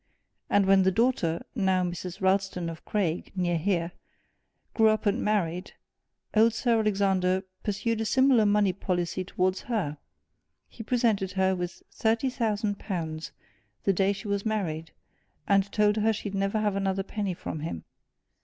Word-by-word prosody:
And 205 -1 +4
when 195 0 +5
the 190 - +4
daughter, 190 -6 +1
now 190 -5 +2
Mrs. 175 +1 -5
Ralston 190 -3 +1
of 160 - -11
Craig, 180 -5 -1
near 175 -2 0
here, 170 -1 0 0.8
grew 220 -1 +4
up 215 0 +2
and 205 +4 +1
married, 180 -4 -1 0.6
old 225 +1 +4
Sir 230 0 +2
Alexander 190 -3 +1 0.2
pursued 220 +2 -1
a - - -1
similar 260 -2 +4
money 205 -2 +3
policy 180 -1 -2
towards 185 0 -1
her 170 -11 -1 0.7
he - - -11
presented 225 -5 +1
her 190 -1 +2
with 180 -1 -5
thirty 230 +4 +1
thousand 215 -4 -1
pounds 160 -5 -4 0.5
the 195 - +3
day 195 +2 +2
she 200 +1 -6
was 200 0 -1
married, 170 -8 -2 0.6
and 200 -1 +3
told 210 0 +3
her 220 +1 +3
she'd 205 -2 -4
never 195 +2 0
have 210 -2 0
another 195 -1 0
penny 200 -2 -3
from 160 - -5
him. 150 - -5
195 Hz, 155 wpm, -27 LUFS, 180-215 Hz, 0.8 s, when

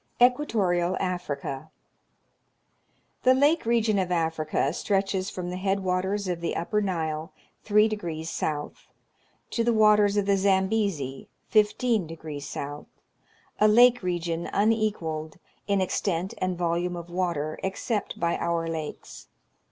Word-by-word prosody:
Equatorial 205 -9 +2
Africa. 155 -6 -3 1.5
The 255 0 +5
lake 290 0 +3
region 225 -3 +2
of 180 -1 -1
Africa 160 -4 0
stretches 195 0 0
from 180 -1 -5
the 180 - -4
head 195 +1 0
waters 190 +2 -1
of 175 -2 -2
the 170 - -2
upper 210 +5 0
Nile 160 -4 -2 0.3
three 210 +1 +4
degrees 170 -7 -4
south, 150 -2 -4 0.6
to 230 - 0
the 235 0 +2
waters 210 -1 +5
of 205 - +2
the 200 0 +3
Zambezi, 190 -8 0 0.2
fifteen 215 -2 +2
degrees 155 -3 -7
south, 145 +1 -6 0.4
— - - -35
a 215 - +6
lake 245 +2 +6
region 170 -2 -2
unequalled, 200 -8 0 0.3
in 200 -1 +2
extent 185 -1 -1
and 185 -1 -1
volume 175 +1 -1
of 170 0 -8
water, 170 -4 -2
except 205 +3 -3
by 170 0 +1
our 170 -1 -1
lakes. 160 -2 -6
185 Hz, 130 wpm, -26 LUFS, 165-210 Hz, 1.5 s, a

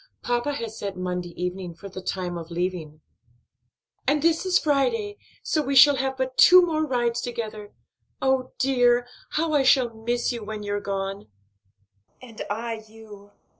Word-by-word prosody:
"Papa 245 +4 0
has 230 -4 -6
set 195 -2 -5
Monday 180 -1 -3
evening 180 -1 -4
for 200 +4 -10
the 190 -1 -8
time 180 -1 -3
of 165 -1 -7
leaving." 170 -3 -4 1.1
"And 290 +1 +2
this 335 +2 +2
is 370 0 +4
Friday; 410 - 0 0.2
so 310 - +1
we 275 -1 -2
shall 280 +1 +8
have 265 0 -2
but 260 0 -3
two 365 0 +9
more 315 -2 -1
rides 240 -2 0
together. 220 -4 -6 0.4
Oh, 265 -1 0
dear! 245 -2 +3 0.3
how 320 0 0
I 290 - +4
shall 255 -3 +4
miss 240 +3 -1
you 235 -3 -5
when 210 0 -6
you're 205 0 -2
gone." 195 0 -4 0.9
"And 235 -4 -11
I 225 +1 -4
you. 210 -2 -14
235 Hz, 160 wpm, -25 LUFS, 200-270 Hz, 1.1 s, two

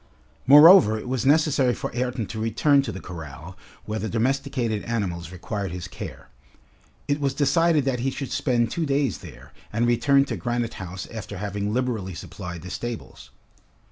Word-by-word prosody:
Moreover, 145 - +8
it 110 - -7
was 130 0 -1
necessary 145 -4 +3
for - - -5
Ayrton 125 -2 -2
to 110 - -5
return 120 +6 +3
to 130 -5 -4
the 95 - -7
corral, 80 0 -9 0.3
where 110 +1 -3
the 110 +2 -3
domesticated 125 -2 -1
animals 90 -8 -3
required 95 +1 -4
his 90 0 -6
care. - - -9 0.8
It 145 0 0
was 140 -2 -1
decided 150 +1 +3
that 130 -2 0
he 130 +3 0
should 135 0 -5
spend 125 -5 +1
two 165 -2 -2
days 140 -5 0
there, - - -13 0.2
and 115 +3 +1
return 130 +4 +3
to - - -4
Granite 120 -1 -2
House 95 -1 -6
after 105 -2 -7
having 100 +1 -3
liberally 110 -7 -2
supplied 85 -2 -8
the 90 - -8
stables. 120 +1 -6
120 Hz, 170 wpm, -24 LUFS, 100-135 Hz, 0.8 s, Moreover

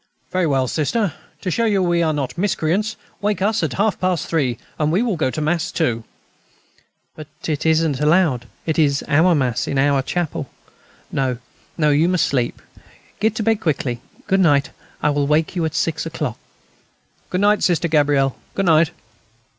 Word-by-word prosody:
Very 185 -2 +1
well, 135 -3 +1
Sister, 165 - 0 0.3
to 185 - -2
show 230 +6 +1
you 200 -4 +2
we 175 -1 +2
are 160 -2 +2
not 145 -4 -3
miscreants, 200 +3 0 0.3
wake 210 0 0
us 210 +3 +1
at 155 -5 -1
half 210 +2 0
past 185 -4 0
three, 135 -8 0 0.2
and 155 0 +1
we 190 +8 +2
will 230 -6 0
go 155 -5 0
to 155 - -4
Mass 170 +3 0
too." 120 -9 0 1.1
"But 155 -2 -9 0.2
it 155 0 -1
isn't 160 -3 +2
allowed. 150 -6 +2 0.2
It 160 0 0
is 145 -2 +2
our 165 +4 +4
Mass, 125 -5 0
in 140 - -1
our 140 0 +3
chapel. 155 -2 -3 0.6
No, 130 -3 0 0.4
no, 150 -3 +3
you 155 +4 +3
must 180 -3 +2
sleep.... 125 -4 -1 0.6
Get 220 +1 +1
to 215 - -2
bed 225 0 +1
quickly. 135 -7 -1 0.2
Good 195 -1 +2
night. 145 -6 +3 0.3
I 150 - +3
will 145 -1 0
wake 155 +4 +1
you 170 -2 0
at 155 - -3
six 160 0 -1
o'clock." 150 -7 -4 0.9
"Good 185 - -1
night, 205 +1 +3
Sister 175 -2 +2
Gabrielle; 145 -4 +2 0.2
good 195 - 0
night.... 160 -2 +4
160 Hz, 180 wpm, -20 LUFS, 145-185 Hz, 1.1 s, our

